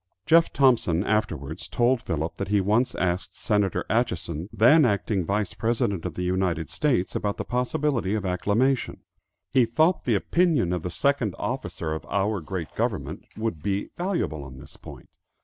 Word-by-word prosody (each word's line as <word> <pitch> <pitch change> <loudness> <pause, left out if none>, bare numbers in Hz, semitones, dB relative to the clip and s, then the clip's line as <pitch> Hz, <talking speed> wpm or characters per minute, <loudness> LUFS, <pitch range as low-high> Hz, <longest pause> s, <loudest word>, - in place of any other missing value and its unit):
Jeff 165 +1 +5
Thompson 120 -11 +3
afterwards 90 -7 -2
told 120 0 +2
Philip 80 -5 -3
that 100 - -3
he 105 +1 +2
once 110 +6 +1
asked 90 +1 -2
Senator 105 -3 0
Atchison, 90 -6 -1
then 120 +9 +6
acting 100 -4 +1
Vice 100 +2 -1
President 110 -6 -1
of 90 -3 -4
the 90 - -3
United 90 -3 -1
States, 130 - 0
about 105 -1 -1
the - - -4
possibility 125 -4 0
of 105 -3 -3
acclimation; 105 +8 0 0.5
he 130 -2 +5
thought 155 +10 +2
the 115 - +2
opinion 155 - +2
of 90 - -2
the 90 - -4
second 120 0 0
officer 80 -2 -3
of 80 - -5
our 100 0 0
great 85 -2 -5
government - - -3
would 110 -8 -3
be 100 +3 -2
valuable 175 - -2
on 65 -1 -10
this - - -13
point. - - -12
100 Hz, 165 wpm, -25 LUFS, 90-125 Hz, 0.5 s, then